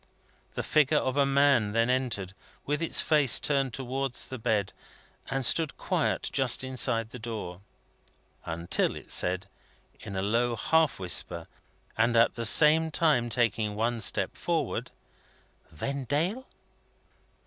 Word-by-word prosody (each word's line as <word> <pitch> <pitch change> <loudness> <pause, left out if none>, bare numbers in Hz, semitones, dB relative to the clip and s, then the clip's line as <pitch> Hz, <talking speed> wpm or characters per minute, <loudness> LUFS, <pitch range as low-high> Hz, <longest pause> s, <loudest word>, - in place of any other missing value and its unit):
The - - -3
figure 150 0 +2
of 130 -2 -1
a 140 -1 +3
man 135 -6 +3
then 115 +1 +2
entered, 125 -7 -2 0.3
with 150 +2 -2
its 165 - 0
face 150 -6 +3
turned 135 -3 0
towards 130 0 -4
the 130 - -6
bed, 110 -4 -1 0.6
and 135 -1 0
stood 160 +3 +3
quiet - - -1
just - - +3
within 125 -3 0
the 125 - -9
door. 105 -6 -6 0.8
Until 85 +1 -1
it - - -10
said, 90 +1 0 0.5
in 100 - -8
a 95 - -2
low 120 +3 0
half 160 +5 +1
whisper, 90 -2 -3 0.5
at 115 0 +3
the 115 - -3
same 160 +7 +5
time 150 -7 +1
taking 110 -3 0
one 115 +2 -1
stop - - 0
forward: - - -2 0.8
"Vendale!" 145 - -3
125 Hz, 130 wpm, -28 LUFS, 110-140 Hz, 0.8 s, same